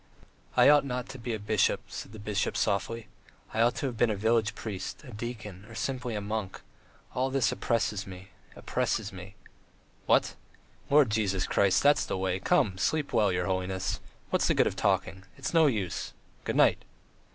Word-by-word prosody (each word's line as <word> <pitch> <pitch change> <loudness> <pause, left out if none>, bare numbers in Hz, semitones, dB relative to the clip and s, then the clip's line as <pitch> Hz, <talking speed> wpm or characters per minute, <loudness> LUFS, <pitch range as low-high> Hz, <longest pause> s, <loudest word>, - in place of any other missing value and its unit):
"I - - +7
ought 145 0 +7
not 125 -2 -3
to 135 -1 -8
be 120 +1 -4
a - - -6
bishop," 105 0 +1
said - - -7
the 110 - -10
bishop 105 +1 -1
softly. 105 +2 -1 0.5
"I 110 - +1
ought 120 +1 +3
to - - -3
have 125 -4 -3
been 120 - +3
a 105 - 0
village 110 +1 +1
priest, 105 +5 -6
a 130 - -10
deacon... 105 -4 -7
or 115 - -11
simply 125 -2 -3
a - - -1
monk.... 100 -2 -4 0.5
All 130 +1 0
this 130 -3 +2
oppresses 105 -4 -1
me... 95 0 -10 0.3
oppresses 105 -2 -2
me." 95 +2 -10 0.7
"What? - - +3 0.6
Lord 140 -5 +5
Jesus 100 -4 +1
Christ.... 100 -2 +3
That's 145 0 +5
the - - -2
way. 95 0 -1
Come, 95 0 +2
sleep 145 +9 0
well, 105 -4 +3
your 90 0 0
holiness!... 95 -1 -2 0.3
What's - - +2
the - - +2
good - - +4
of - - -1
talking? 95 0 0
It's 135 +3 -4
no 165 -2 +6
use. 105 -9 -2 0.3
Good - - -1
night!" - - +4
110 Hz, 185 wpm, -29 LUFS, 95-125 Hz, 0.7 s, I